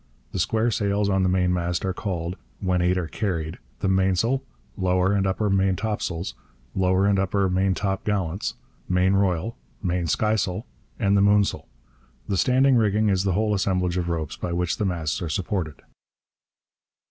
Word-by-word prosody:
The - - -3
square 110 +6 +1
sails 100 -1 +1
on 95 -1 +2
the 95 - +2
mainmast 90 -1 +1
are 95 - 0
called, 90 -3 -3 0.2
when 90 -2 +1
eight 90 +1 +2
are 90 -3 -1
carried, 85 -5 -3 0.2
the - - +1
mainsail, 95 +7 +2 0.3
lower 90 0 +2
and 100 -1 +2
upper 100 +3 0
maintopsails, 95 -2 0 0.4
lower 95 +1 +2
and 100 -1 +3
upper 95 0 +1
maintopgallants, 95 0 0 0.3
main 90 +1 +3
royal, 95 +2 +1 0.3
main 90 -1 0
skysail, 105 +1 0 0.3
and 100 -3 +2
the 100 - +4
moonsail. 100 0 +2 0.6
The 100 - 0
standing 130 +4 +4
rigging 105 -1 +2
is 95 -1 +1
the 95 - +2
whole 105 +2 +1
assemblage 90 -3 0
of 90 -1 -1
ropes 80 -3 -2
by 85 - -4
which 90 -1 0
the 105 - 0
masts 85 -1 -1
are 85 - -3
supported. 85 -1 -3
95 Hz, 155 wpm, -24 LUFS, 90-100 Hz, 0.6 s, the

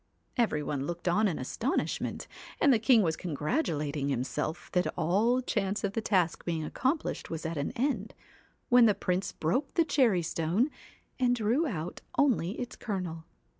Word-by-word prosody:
CAT - - +2
Every 150 -8 -3
one 140 -1 -2
looked 175 +1 -5
on 210 +5 +3
in 175 - -1
astonishment, 225 - -2 0.3
and 280 - +5
the 230 - +3
king 225 -1 +5
was 160 -3 +1
congratulating 150 - -1
himself 145 +5 -3
that 180 0 +2
all 210 +10 +2
chance 205 -4 -1
of 200 -1 -1
the 225 - -1
task 185 -6 +1
being 165 -2 -2
accomplished 265 - -1
was 165 0 -5
at 165 +1 -2
an 145 -1 -1
end, 240 -5 -1 0.5
when 245 -1 +7
the 210 - +3
Prince 185 -1 -1
broke 250 - -1
the 335 - +4
cherry 240 - +3
stone, 170 - 0 0.5
and 245 -1 +3
drew 240 +8 +1
out 175 - -4 0.2
only 235 - +2
its 245 -1 -5
kernel. 180 -7 -4
190 Hz, 170 wpm, -30 LUFS, 160-245 Hz, 0.5 s, when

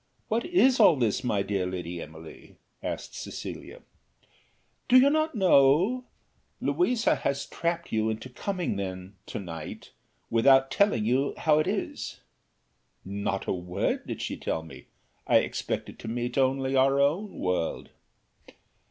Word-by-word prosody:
What 230 +2 0
is 265 -8 +4
all 190 -7 +7
this, 120 -2 0
my 105 -5 0
dear 95 -2 -1
Lady 90 -2 -5
Emily?" 80 +1 -12 0.3
asked - - -5
Cecilia. - - -7 1.1
"Do 255 - +8
not 310 -1 +1
you - - -3
know? 180 - +4 0.5
Louisa 250 -10 +2
has 140 0 -2
trapped 170 0 -3
you 110 0 +1
into 110 +3 -4
coming 175 - -3
then, 95 0 -5
to - - -5
night 80 -5 -8 0.4
without 135 +3 +5
telling 200 - +2
you 130 +5 +1
how 155 -1 +3
it 155 - 0
is?" - - -3 0.9
"Not 100 0 -3
a - - 0
word 90 +1 -2
did - - -4
she - - -3
tell 80 - -3
me, 80 - -12 0.4
I - - +6
expected - - -2
to - - -8
meet 120 +2 -3
only 135 0 +1
our 135 +1 +4
own 165 +9 +1
world." 90 -2 -2
130 Hz, 140 wpm, -27 LUFS, -, 1.1 s, Do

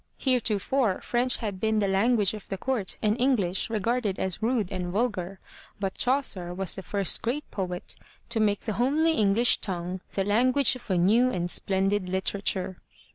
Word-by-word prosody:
Heretofore, 245 -3 +1
French 245 +1 +2
had 205 -4 -4
been 220 +2 +1
the 205 -2 +2
lan 200 +6 +3
guage 205 -3 +2
of 210 - -9
the 195 - -3
court 230 -3 -1
and 210 0 +2
English 205 -9 +1
regarded 225 -1 -1
as 190 +2 -3
rude 220 -4 0
and 185 -2 -3
vulgar, 195 -3 -2 0.4
but 195 -1 -2
Chaucer 210 -10 0
was 190 -1 +1
the 190 - -3
first 200 0 -1
great 270 +6 -2
poet 180 -3 -4 0.3
to 235 -1 0
make 205 -2 +1
the 220 - -3
homely 305 +6 +3
English 220 -1 +3
tongue 180 -1 -4
the 195 - +1
language 255 +6 +3
of 245 -3 -12
a 185 - +2
new 220 +8 +4
and 175 -6 -1
splendid 195 0 +1
literature. 190 0 -2
205 Hz, 175 wpm, -27 LUFS, 190-240 Hz, 0.4 s, new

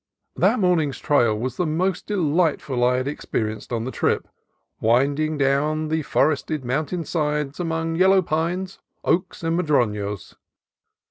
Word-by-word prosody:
That - - +3
morning's 170 -7 +2
trail 120 -7 +2
was 125 +3 -4
the 180 - +1
most 180 +4 -1
delightful 160 -8 +1
I 125 +1 +3
had 130 +1 -2
experienced 110 -7 -3
on 115 -2 -1
the 130 - -4
trip, - - 0 0.5
winding 140 +7 +2
down 150 +3 +1
the 160 0 0
for 150 +1 +2
ested 150 0 -4
mountain 155 +7 -2
side 150 -2 -1
among 165 -1 -1
yellow 190 +1 +5
pines, 175 +4 -2 0.2
oaks, 180 +1 0
and 165 0 0
madronos. 105 - 0
150 Hz, 140 wpm, -23 LUFS, 130-165 Hz, 0.5 s, yellow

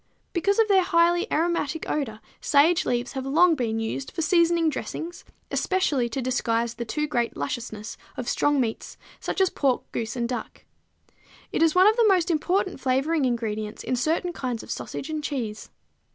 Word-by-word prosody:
_ - - -45 0.3
Because 395 +3 +1
of 450 -1 +4
their 390 -2 +5
highly 345 +2 +2
aromatic 320 -2 0
odor 225 -8 -2 0.2
sage 310 +4 +3
leaves 240 0 -1
have 265 - -4
long 325 +6 +4
been 230 -6 -1
used 225 +4 -3
for 330 - -3
seasoning 335 0 +3
dressings, 325 +3 -4 0.3
especially 290 -10 +1
to 255 +3 -3
disguise 235 -2 0
the 240 -1 -5
too 300 +7 -1
great 240 -6 -1
lusciousness 230 -5 -5 0.2
of 245 - -4
strong 290 -1 +2
meats, 230 -3 -3 0.2
such - - -3
as 380 -1 +3
pork, 270 -3 +1
goose 230 +1 -3
and 235 -1 -1
duck. 245 0 -6 0.9
It - - -1
is 325 0 +4
one 370 +1 +7
of 435 +3 +5
the 460 -2 +5
most 365 -3 +3
important 365 +3 0
flavoring 270 +4 +1
ingredients 220 -3 -2
in 255 - -1
certain 325 +7 0
kinds 250 -6 -4
of - - -8
sausage 295 - -5
and 305 -1 -3
cheese. 235 -8 -4
285 Hz, 180 wpm, -25 LUFS, 240-340 Hz, 0.9 s, one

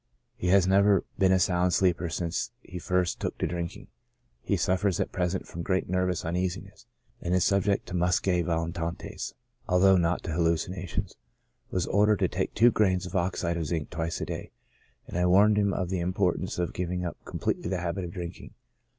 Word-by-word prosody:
He 90 - -3
has 95 0 +5
never 100 0 +4 0.2
been 95 -1 +4
a 95 - +5
sound 90 -1 +2
sleeper 90 -2 +2
since 85 +3 -2
he 90 - -7
first 90 0 0
took - - -3
to - - -1
drinking. 85 +1 -4 0.6
He - - 0
suffers 95 0 +1
at - - -1
present 90 +1 -1
from 85 - -6
great 95 +2 0
nervous 90 -1 0
uneasiness, 90 +3 -3 0.3
and 90 +1 0
is 90 - +3
subject 100 0 +2
to - - -8
muscae 90 0 +2
volitantes, 85 0 -3 0.3
although 95 +1 +5
not 85 0 +1
to 85 - -4
hallucinations. 85 +2 -1 0.5
Was 90 -2 -1
ordered 105 +1 +3
to - - +4
take - - -3
two 120 +3 +6
grains 95 -4 +2
of 90 +2 -7
oxide 85 -1 0
of 80 -3 -2
zinc 80 -2 -3
twice 80 +1 -3
a - - -2
day, - - -6 0.6
and 90 - -4
I 90 - +3
warned 100 +3 +5
him 100 -1 +2
of 90 -1 -2
the 95 - 0
import 90 +1 +1
ance 95 - -4
of 90 -1 -1
giving 90 0 -2
up 85 - -6
completely - - -2
the 95 - 0
habit 90 +2 -2
of 85 - -5
drinking. 85 0 -8
90 Hz, 190 wpm, -28 LUFS, 85-95 Hz, 0.6 s, two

